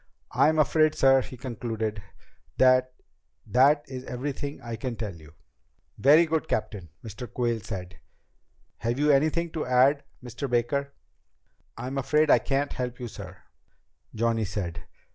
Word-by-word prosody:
I'm 155 +1 +3
afraid, 155 0 +3
sir," 135 0 +5
he 130 - -9
concluded, 110 -3 -4 0.6
"that 130 0 +4 0.5
that 145 +4 +4
is 130 -1 -7
everything 140 +3 -5
I 115 -1 -6
can 120 +2 -4
tell 110 -4 -5
you." 80 -2 -16 0.6
"Very 150 +5 +6
good, 160 0 -1
Captain," 105 -5 -3
Mr. 110 +1 -8
Quayle 120 -2 -1
said. 90 -3 -7 0.8
"Have 115 +2 -1
you 150 +1 +3
anything 155 +4 +2
to 160 -2 -3
add, 130 +3 +3 0.2
Mr. 130 +3 -5
Baker?" 140 +4 0 0.8
"I'm 135 +2 -3
afraid 150 +3 +2
I - - +7
can't 140 +4 -1
help 125 -1 -4
you, 125 - -5
sir," 95 -4 -10 0.7
Johnny 115 0 +1
said. 90 -4 -5
125 Hz, 140 wpm, -27 LUFS, 115-140 Hz, 0.8 s, I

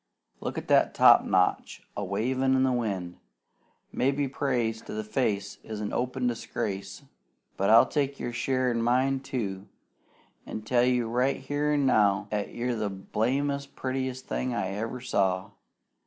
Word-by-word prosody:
Look - - -4
at - - -5
that - - +3
topknot 90 -1 +4 0.2
a 100 - -3
wavin' 130 +7 +1
in 130 - +3
the 130 - +3
wind! 100 -8 -2 0.7
Maybe 140 +2 +1
praise 120 -5 -1
to - - -9
the 110 - -3
face 105 -4 -1
is 110 -1 -6
open 125 +4 -2
disgrace; 105 -2 -3 0.5
but 100 - 0
I'll 115 +1 +8
take 140 -2 -1
your 120 - -4
share 130 +1 0
an' 115 -1 -1
mine, 130 +3 +2
too, 110 -8 -4 0.8
an' 110 - -5
tell 120 +2 +3
you 125 -2 +1
right 125 +4 +1
here 145 +2 -1
an' 145 -2 +2
now 105 -5 +3
'at 105 -1 -2
you're 120 0 -1
the 105 -2 -1
blamedest 140 +8 -2
prettiest 130 0 -3
thing 125 -1 -2
'at - - 0
I 95 - -2
ever 110 +5 -4
saw. 95 -4 0
120 Hz, 155 wpm, -28 LUFS, 105-130 Hz, 0.8 s, I'll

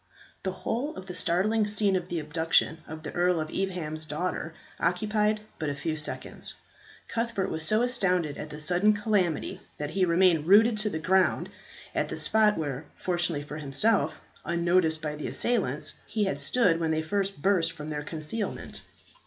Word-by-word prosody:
The 190 - -2
whole 245 +9 -3
of 185 - -8
the 180 - -7
startling 200 +5 +1
scene 205 -1 +2
of 180 -1 -1
the 175 - -3
abduction 160 +2 +1
of 155 0 -8
the - - -5
Earl 175 -1 +2
of 155 0 -3
Evesham's 175 -5 -2
daughter 160 +1 -3 0.2
occupied 210 +4 +1 0.2
but 155 - -1
a 140 - -2
few 155 +3 -2
seconds. 150 -1 -5 0.5
Cuthbert 230 -4 -1
was 160 0 -2
so 215 +8 +3
astounded 180 - +1
at 150 - -7
the 150 - -8
sudden 180 +7 +3
calamity 205 -6 0 0.2
that 150 0 -4
he 190 +2 +1
remained 170 -3 +4
rooted 215 +3 +6
to 210 0 +1
the 160 - -3
ground 185 +4 +2 0.4
at - - 0
the - - -4
spot 215 -1 +3
where, 145 -2 -3
fortunately 175 -4 -1
for 150 +1 -7
himself, 155 +3 +2 0.2
unnoticed 170 -2 +2
by 150 -1 -2
the 150 - -5
assailants, 155 - 0
he 215 -1 0
had 145 -8 -1
stood 165 - +3
when 165 -1 0
they 160 0 +1
first 195 +2 -1
burst 170 -1 +2
from 155 -1 -7
their 150 -1 -2
concealment. 155 +8 -4
175 Hz, 175 wpm, -28 LUFS, 155-205 Hz, 0.5 s, rooted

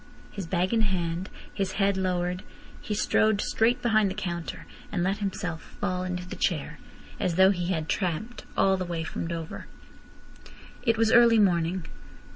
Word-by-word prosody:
His 195 -5 -6
bag 180 +4 0
in 225 - +3
hand, 180 -2 -1 0.2
his 195 -2 -2
head 200 -1 +2
lowered, 180 -1 -1 0.4
he 210 - -3
strode 215 0 +3
straight 230 +4 +1
behind 215 -4 +3
the 190 - -5
counter, 175 -5 -4 0.3
and 180 -4 0
let 195 +3 0
himself 180 -5 -3 0.2
fall 185 -3 -1
into 180 0 -4
the - - -6
chair, - - -1 0.4
as 175 - 0
though 190 +2 +6
he 175 -3 -2
had 160 -4 -1
tramped 195 +7 -2
all 190 0 +4
the 185 - -2
way 170 -2 -3
from 165 - -4
Dover. 165 -1 -5 1.1
It 230 -1 +2
was 225 0 +3
early 235 -1 +7
morning. 175 -3 +2
185 Hz, 165 wpm, -27 LUFS, 175-205 Hz, 1.1 s, early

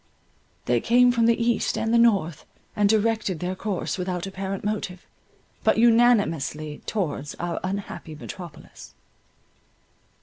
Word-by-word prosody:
They 120 -1 +1
came 245 +1 +5
from 230 -1 +2
the 235 0 +3
east 235 -1 0
and 225 +1 0
the 235 - +5
north, 200 -9 +2 0.3
and 205 -2 +3
directed 220 -4 +1
their 180 +1 -2
course 195 -1 -3
without 180 -1 -3
apparent 195 0 -5
motive, 200 -3 -4 0.6
but - - +3
unanimously 205 - +2
towards 150 -8 -3
our 175 0 -3
unhappy 185 -4 -5
metropolis. 170 +1 -11
195 Hz, 125 wpm, -24 LUFS, 175-225 Hz, 0.6 s, came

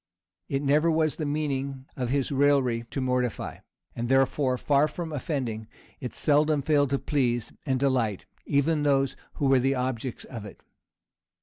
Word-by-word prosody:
It 140 +1 -1
never 150 +4 +3
was 160 -2 +1
the 155 - -2
meaning 140 -3 -2
of 125 -3 -2
his 135 +1 0
raillery 135 -4 +2
to 135 - -3
mortify; 125 -2 -1 0.4
and 120 0 -3
therefore, 135 0 +2
far 145 +3 +3
from 165 0 -6
offending, 125 -7 -3 0.3
it 125 - -6
seldom 150 0 +2
failed 145 -2 +3
to 140 - +1
please 120 -5 -1
and 130 -1 +1
delight, 125 -7 0 0.2
even 150 +2 +2
those 135 -2 +2 0.2
who 145 - -1
were 135 -1 +5
the 135 +2 +1
objects 125 -1 -3
of 115 -5 -8
it. 105 - -11
135 Hz, 160 wpm, -27 LUFS, 125-145 Hz, 0.4 s, were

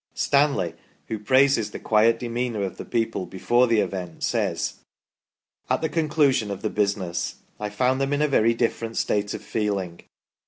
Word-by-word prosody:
Stanley, 140 - +2 0.4
who 110 - -3
praises 130 0 +3
the - - -7
quiet 115 +1 +3
demeanour 120 -2 -2
of 95 - -4
the - - -7
people 115 -5 -1
before 120 +6 +2
the 115 -2 +3
event, 90 -4 -5
says: - - -1 0.4
" - - -43
At - - +1
the 160 - 0
conclusion 150 -8 +2
of 100 +1 -5
the 110 - -1
business 95 -5 -1 0.2
I 105 0 -3
found 125 +6 +1
them 135 +1 0
in 145 +1 +1
a - - +3
very 115 -4 +3
different 115 -1 -1
state 105 0 0
of - - -8
feeling. 100 -6 -2
115 Hz, 170 wpm, -24 LUFS, 100-130 Hz, 0.4 s, praises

